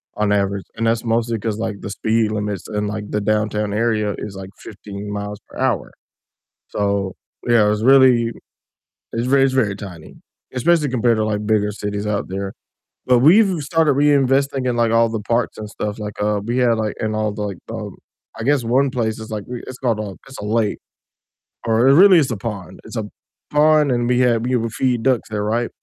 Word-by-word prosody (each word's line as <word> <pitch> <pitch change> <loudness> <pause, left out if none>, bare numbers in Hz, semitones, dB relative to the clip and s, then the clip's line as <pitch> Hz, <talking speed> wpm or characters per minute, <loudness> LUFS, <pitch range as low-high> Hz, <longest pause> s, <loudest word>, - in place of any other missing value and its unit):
on 105 -1 0
average, 100 -1 0
and 115 - 0
that's 115 0 +1
mostly 115 0 0
'cause, 110 0 -3
like, 110 -3 -4
the - - -6
speed 110 +2 0
limits 105 -3 -3
in, 105 0 -1
like, 105 0 -5
the 105 - 0
downtown 105 0 0
area 105 -2 0
is, 105 - -6
like, 95 0 -8
15 105 -1 -8
miles 105 0 -5
per - - -12
hour, 125 -9 0 0.8
so, 100 -2 -1 0.4
yeah, 115 -3 +5
it's 105 +1 -1
really 130 -3 +5 0.8
it's 115 +1 -1
very 135 +1 +4
it's 130 - 0
very 110 -7 +1
tiny, 90 -6 -10 0.4
especially 150 +4 +2
compared 120 -2 +2
to, 110 - +1
like, 105 -1 -2
bigger 105 -1 +2
cities 105 0 -4
out 105 -1 -1
there, 95 +1 -4 0.5
but, 125 -1 +5
we've 180 - +5
started 155 0 +2
reinvesting 140 -2 +2
in, 120 - -1
like, 115 -1 +2
all 115 0 +4
the 110 -1 -3
parks 115 +3 -1
and 110 - -6
stuff, 105 0 -4
like, 105 -1 -5
uh, 105 0 +1
we 120 +2 -1
had, 120 -2 +3
like 110 -1 -1
and 110 0 -2
all 110 -1 -1
the, 105 - -6
like, 100 -3 -4
um 105 -4 -6 0.4
I - - -4
guess 140 0 +2
one 130 +4 +2
place 115 -4 -2
is, 110 - -8
like, 105 -2 -4
we 125 -1 -6
it's 130 - -7
called 115 -4 0
a 100 -3 -5
it's 135 - -11
a - - -5
lake, 110 -1 0 0.9
or 115 +2 +3
really 185 +4 +7
it's 140 -5 0
a - - -1
pond 100 -3 -6
it's 110 +2 -8
a 110 - -2 0.5
pond, 150 0 +4
and 120 -1 0
we 125 0 +2
had 120 -2 +2
we 125 +1 +1
would 115 -1 -2
feed 125 -2 0
ducks 130 -5 +1
there, 105 -1 -2
right, 115 +3 0
110 Hz, 205 wpm, -20 LUFS, 105-125 Hz, 0.9 s, really